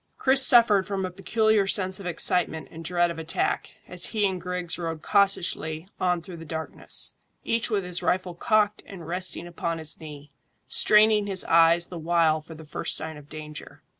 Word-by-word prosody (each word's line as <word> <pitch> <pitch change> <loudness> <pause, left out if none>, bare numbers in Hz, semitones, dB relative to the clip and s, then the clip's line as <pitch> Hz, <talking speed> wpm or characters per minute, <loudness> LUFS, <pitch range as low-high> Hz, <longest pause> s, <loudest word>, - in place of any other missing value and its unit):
Chris 265 0 +4
suffered 225 -7 +5
from 195 -2 -2
a 185 - -5
peculiar 215 +2 +1
sense 190 -1 0
of 190 - -7
excitement 170 -1 +1
and 165 +1 -9
dread 175 +1 +1
of 165 - -7
attack, 160 0 -2 0.2
as 180 -1 -3
he 215 -2 0
and 185 -2 -4
Griggs 180 -1 -3
rode 165 -2 -4
cautiously 180 -4 0
on 180 -2 0
through 175 -1 -9
the 165 - -9
darkness, 160 0 -4 0.3
each 230 0 0
with 205 -3 0
his 180 -1 -4
rifle 180 -1 0
cocked 210 +3 +1
and 180 -5 -10
resting 180 0 0
upon 170 -1 -4
his 160 -1 -7
knee, 150 -2 -11 0.4
straining 210 -1 +4
his 190 -2 -2
eyes 165 +1 +4
the 175 -1 -8
while 160 -1 +2
for 160 +1 -11
the 160 0 -12
first 150 - 0
sign 160 0 -4
of 150 0 -14
danger. 150 -1 -9
175 Hz, 185 wpm, -26 LUFS, 160-195 Hz, 0.4 s, suffered